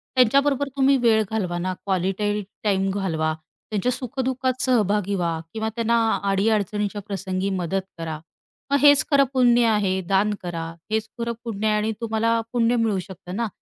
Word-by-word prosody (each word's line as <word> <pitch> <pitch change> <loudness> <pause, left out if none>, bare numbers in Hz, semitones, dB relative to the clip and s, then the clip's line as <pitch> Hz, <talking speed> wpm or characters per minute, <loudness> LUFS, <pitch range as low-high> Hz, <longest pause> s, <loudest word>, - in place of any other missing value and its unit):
त्यांच्याबरोबर 275 +3 +3
तुम्ही 270 0 +4
वेळ 220 -2 +4
घालवा 185 -6 -1
ना, 185 +1 -2
क्वालिटी 195 +2 0 0.2
टाईम 195 -2 +1
घालवा, 165 -5 -1 0.4
त्यांच्या 215 +4 0
सुख-दुःखात 260 0 -2
सहभागी 210 -5 +1
व्हा 170 -3 -1
किंवा 220 0 -2
त्यांना 235 0 +1 0.3
अडी-अडचणीच्या 205 0 0
प्रसंगी 190 -1 -2
मदत 190 0 -1 0.2
करा. 160 -2 -5 0.5
मग 280 - +5
हेच 285 -1 +7
खरं 280 -1 +6
पुण्य 245 -2 +4
आहे, 200 -4 +1
दान 195 +3 +1
करा 170 -2 -4 0.3
हेच 220 0 0
खरं 235 0 -1
पुण्य 220 -2 -2
आहे 215 - +3
आणि 215 +1 0
तुम्हाला 230 0 +1
पुण्य 240 0 +2
मिळू 225 -4 +1
शकतं 180 -1 -8
ना, 230 +2 -1
210 Hz, 155 wpm, -23 LUFS, 190-235 Hz, 0.5 s, हेच